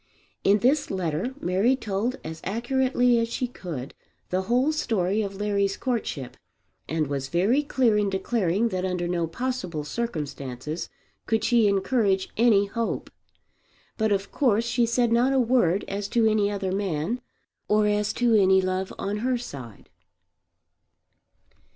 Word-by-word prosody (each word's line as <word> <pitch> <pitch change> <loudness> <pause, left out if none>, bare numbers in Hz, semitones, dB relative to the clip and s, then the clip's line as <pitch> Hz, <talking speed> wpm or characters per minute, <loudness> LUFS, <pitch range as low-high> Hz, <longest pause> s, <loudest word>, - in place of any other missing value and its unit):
In 200 +1 +5
this 260 +8 +2
letter 185 - -2
Mary 195 +7 +2
told 225 +2 -2
as 160 0 -7
accurately 245 +3 +2
as 230 - 0
she 245 +2 -2
could 160 - -7 0.4
the 185 +1 +1
whole 255 +5 +3
story 215 - 0
of 200 -2 -4
Larry's 200 -1 0
courtship, 225 - -3 0.5
and 160 -1 0
was 140 -1 -3
very 195 - +2
clear 250 -7 +2
in 205 -1 +1
declaring 195 +1 0
that 185 -3 -2
under 180 -2 -1
no 170 -1 0
possible 185 -6 -3
circumstances 150 - -4 0.4
could 220 0 +1
she 235 -3 +4
encourage 200 -1 +1
any 215 -3 +4
hope. 230 +3 -3 0.8
But 220 -1 0
of 200 0 -1
course 235 -5 +2
she 235 0 +1
said 235 0 +1
not 245 +3 +3
a 265 - +3
word 225 -7 +2
as 200 0 -3
to 230 +1 +2
any 215 -2 +3
other 200 -2 -2
man 195 +3 -2 0.5
or 210 0 +3
as 210 0 +1
to 240 -2 +2
any 190 -3 +5
love 185 0 -1
on 200 +1 -2
her 250 +3 0
side. 130 - -9
205 Hz, 145 wpm, -25 LUFS, 185-235 Hz, 0.8 s, In